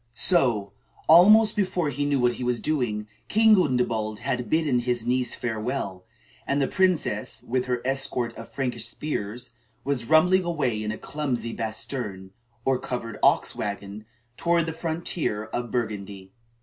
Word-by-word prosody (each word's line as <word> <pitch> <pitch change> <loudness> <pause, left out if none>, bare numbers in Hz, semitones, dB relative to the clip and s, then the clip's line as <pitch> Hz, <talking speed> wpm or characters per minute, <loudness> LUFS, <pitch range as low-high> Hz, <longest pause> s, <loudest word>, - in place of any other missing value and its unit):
So, 115 - +2 0.3
almost 210 +7 +7
before 185 -7 0
he 145 +2 -2
knew 140 -2 +1
what 125 -1 +3
he 125 - -6
was 125 -1 0
doing, 120 -9 -1 0.2
King 220 0 +5
Gundebald 125 - +1
had 125 0 -3
bidden 155 -6 +2
his 120 -1 -1
niece 125 0 0
farewell; 110 -5 -3 0.4
and 140 - +1
the 135 - +2
princess, 180 - 0
with 125 +1 -1
her 125 -1 -2
escort 130 -3 -1
of 115 - -10
Frankish 125 -4 -2
spears, 120 -3 -4 0.3
was 135 -4 -1
rumbling 180 +4 +5
away 140 -11 -1
in 105 0 -2
a 110 - -5
clumsy 130 -6 -3
basterne, 110 -4 -5 0.3
or 135 -1 +2
covered 115 -3 -5
ox - - +3
wagon, 100 +1 -5 0.3
toward 170 -1 +2
the 165 - -4
frontier 160 -8 -2
of 120 -1 -2
Burgundy. 100 -5 -4
125 Hz, 150 wpm, -25 LUFS, 110-155 Hz, 0.4 s, almost